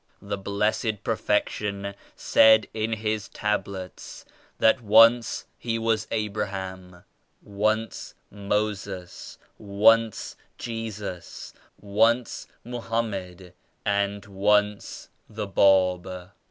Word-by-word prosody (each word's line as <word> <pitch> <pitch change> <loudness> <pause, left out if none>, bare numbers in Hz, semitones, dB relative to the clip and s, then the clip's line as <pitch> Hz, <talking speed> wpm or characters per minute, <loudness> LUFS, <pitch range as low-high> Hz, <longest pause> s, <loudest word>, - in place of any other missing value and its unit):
The 100 0 -3
Blessed 105 +2 -1
Perfection 100 -1 -1 0.2
said 110 -1 +5
in 110 +1 -1
His 110 -1 -2
Tablets 100 -3 -4 0.3
that 110 +3 +4
once 115 +2 +5
He 115 -1 -2
was 115 -1 0
Abraham, 95 -4 -4 0.4
once 110 +2 -2 0.2
Moses, 100 -3 -4 0.2
once 110 +2 +2 0.2
Jesus, 105 -6 -6 0.3
once 115 +4 +1 0.2
Mo 120 +1 -6
hammed 95 -6 -4 0.3
and 100 0 0
once 105 +1 0 0.2
the 110 -1 -4
Bab. 95 -2 +2
105 Hz, 85 wpm, -25 LUFS, 100-110 Hz, 0.4 s, said